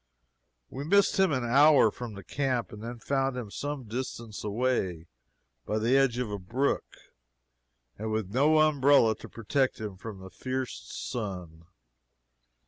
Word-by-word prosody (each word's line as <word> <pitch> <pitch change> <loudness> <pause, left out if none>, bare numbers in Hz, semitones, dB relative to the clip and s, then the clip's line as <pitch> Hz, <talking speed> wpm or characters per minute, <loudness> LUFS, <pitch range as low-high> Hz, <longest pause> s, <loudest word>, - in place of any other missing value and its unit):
We 135 - -5
missed 200 +5 +3
him 190 -3 +4
an 130 -4 0
hour 135 -1 +6
from 120 -2 -7
the 100 - -9
camp, 130 - -1
and 105 - -9
then 120 +2 -6
found 135 +1 -1
him 115 -5 -6
some 145 +2 -4
distance 115 -2 -5
away, 105 -6 -1 0.6
by 105 - -2
the 115 +4 +2
edge 135 -3 +3
of 125 -4 -2
a 100 - -3
brook, 125 +10 -1 1.0
and 110 +1 -3
with 110 -3 -2
no 150 +5 +4
umbrella 140 -6 +4
to - - -11
protect 130 +4 -1
him 105 -4 -6
from 105 +1 -8
the 95 0 -11
fierce 130 - -4
sun. 90 -8 -5
120 Hz, 150 wpm, -28 LUFS, 105-135 Hz, 1.0 s, hour